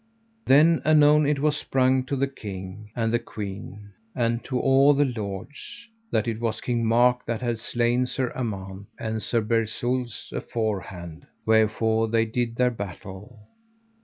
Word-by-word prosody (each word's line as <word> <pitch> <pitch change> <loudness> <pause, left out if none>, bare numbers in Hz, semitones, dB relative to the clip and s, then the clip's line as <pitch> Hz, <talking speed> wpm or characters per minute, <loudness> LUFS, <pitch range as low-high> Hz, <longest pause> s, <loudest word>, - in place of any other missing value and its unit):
Then 155 +5 +5
anon 150 -1 +5
it 150 0 +2
was 150 +1 +1
sprung 130 -2 +1
to 140 - -2
the 135 +1 +1
king, 105 -5 -8
and 115 -1 0
the 120 - +3
queen, 100 -2 -8 0.2
and 115 -1 0
to 130 -2 -1
all 135 +2 +5
the 145 +1 +3
lords, 110 - -6 0.2
that 110 +1 0
it 115 -1 -2
was 115 -2 -2
King 120 -2 -1
Mark 125 +2 +3
that 115 0 -2
had 120 -2 -1
slain 120 +2 +1
Sir 130 -1 -2
Amant, 100 -5 -5
and 110 0 -3
Sir 115 +2 0
Bersules 115 +2 -2
afore 110 -4 -2
hand; 85 -3 -10 0.2
wherefore 110 0 +2
they 115 0 +2
did 115 +1 -2
their 125 +1 +2
battle. 100 +1 -8
115 Hz, 155 wpm, -25 LUFS, 110-130 Hz, 0.2 s, Then